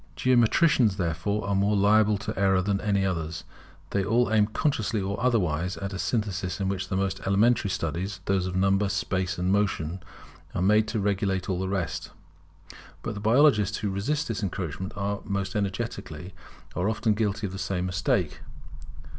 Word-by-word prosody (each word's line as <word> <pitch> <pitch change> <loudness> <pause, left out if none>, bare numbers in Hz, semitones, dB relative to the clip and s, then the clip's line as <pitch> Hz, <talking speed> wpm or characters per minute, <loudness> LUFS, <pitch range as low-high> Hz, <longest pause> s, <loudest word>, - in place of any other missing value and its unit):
Geometricians, 125 - +3
therefore, 95 +4 -1
are 100 - 0
more 100 +2 +2
liable 105 +1 +4
to 105 - -4
the - - -6
error 95 -1 +3
than 100 0 0
any 100 -1 +1
others; 80 -3 -3 0.5
they 100 - +1
all 115 +3 +2
aim 105 -1 +4
consciously 110 -2 0
or 100 +1 -3
otherwise 90 -8 +1
at 100 0 -5
a 95 - -5
synthesis 95 -1 -2
in 95 - -1
which 95 -1 -2
the 95 - -1
most 95 0 -1
elementary 105 +2 +3
studies, 95 +2 -3
those 95 -2 +1
of 90 - -4
Number, 95 +1 +2
Space, 95 -1 -1
and 90 +1 0
Motion, 95 -4 0 0.5
are - - 0
made 105 +2 +4
to 110 0 -2
regulate 95 -2 0
all 90 - -1
the 95 0 -2
rest. 95 -5 -3 0.9
But 115 - -3
the 105 - -6
biologists 110 -2 +4
who 105 - -2
resist 145 +11 -1
this 115 -3 -3
encroachment 95 -2 -4 0.4
most 100 +2 -2
energetically, 95 -5 -4 0.4
are 90 +4 +1
often 110 0 +1
guilty 105 -1 -1
of 95 - -5
the 95 - -6
same 90 -1 -2
mistake. 90 -3 0
100 Hz, 170 wpm, -27 LUFS, 95-105 Hz, 0.9 s, liable